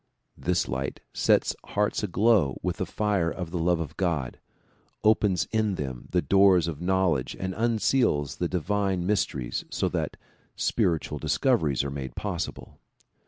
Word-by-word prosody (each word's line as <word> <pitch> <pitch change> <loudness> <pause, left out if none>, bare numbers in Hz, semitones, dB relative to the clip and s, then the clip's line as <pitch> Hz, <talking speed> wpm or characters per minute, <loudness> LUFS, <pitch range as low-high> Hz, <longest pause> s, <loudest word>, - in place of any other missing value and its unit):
This 90 0 0
light 65 +1 -3
sets - - +2
hearts 105 0 0
aglow 100 - +2
with - - -1
the - - -2
fire 100 -6 0
of 85 -1 -5
the 90 - -2
love 85 0 +2
of 75 -2 -5
God, 80 -9 -1 0.6
opens 105 -4 +3
in 110 -3 +1
them 65 -6 -5
the 90 -1 +1
doors 95 -4 +5
of 80 -2 -5
knowledge 90 -7 +1
and 95 0 -3
unseals 110 - +1
the 90 - 0
divine 95 +1 0
mysteries 90 -11 -1
so - - -1
that - - -3 0.4
spiritual 80 -3 0
discoveries 75 - +1
are 70 - -3
made 65 -3 -6
possible. 90 -4 -5
90 Hz, 145 wpm, -27 LUFS, 75-100 Hz, 0.6 s, doors